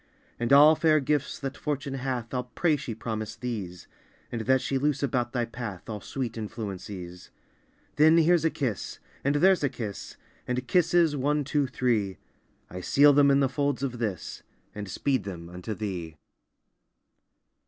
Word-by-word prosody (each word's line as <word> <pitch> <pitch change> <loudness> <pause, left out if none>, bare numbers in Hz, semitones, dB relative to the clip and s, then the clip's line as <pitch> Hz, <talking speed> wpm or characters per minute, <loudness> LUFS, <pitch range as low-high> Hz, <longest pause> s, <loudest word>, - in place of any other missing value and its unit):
And 120 +2 -1
all 145 +3 +9
fair 155 -1 +3
gifts 145 0 -1
that 135 -1 -5
Fortune 140 -2 -3
hath, 130 -3 -3
I'll 125 -1 -1
pray 150 +6 +1
she 135 -6 -5
promise 110 -1 -4
these, 105 -7 -5 0.5
And 120 - -3
that 130 0 +5
she 135 +1 -1
loose 145 0 0
about 125 -3 0
thy 120 -2 0
path 115 -5 -7
All 105 -2 -5
sweet 120 -4 -4
influences. 95 -4 -7 0.7
Then 155 +2 +6
here's 170 0 +4
a 165 - +3
kiss! 125 - -3 0.3
and 140 +1 +1
there's 185 +2 +4
a 145 - +2
kiss! 115 -6 -7 0.3
And 125 0 -2
kisses, 175 -3 +3
one, 145 +2 +1
two, 145 0 0
three! 115 -7 0 0.5
I 90 +1 -7
seal 145 +9 +5
them 140 0 +5
in 140 0 +4
the 135 - +4
folds 140 0 -1
of 125 -3 -3
this, 105 -7 -4 0.3
And 105 -2 -6
speed 135 +7 0
them 85 -3 -7
unto 90 +5 -5
thee! 90 -7 -5
125 Hz, 165 wpm, -27 LUFS, 110-145 Hz, 0.7 s, all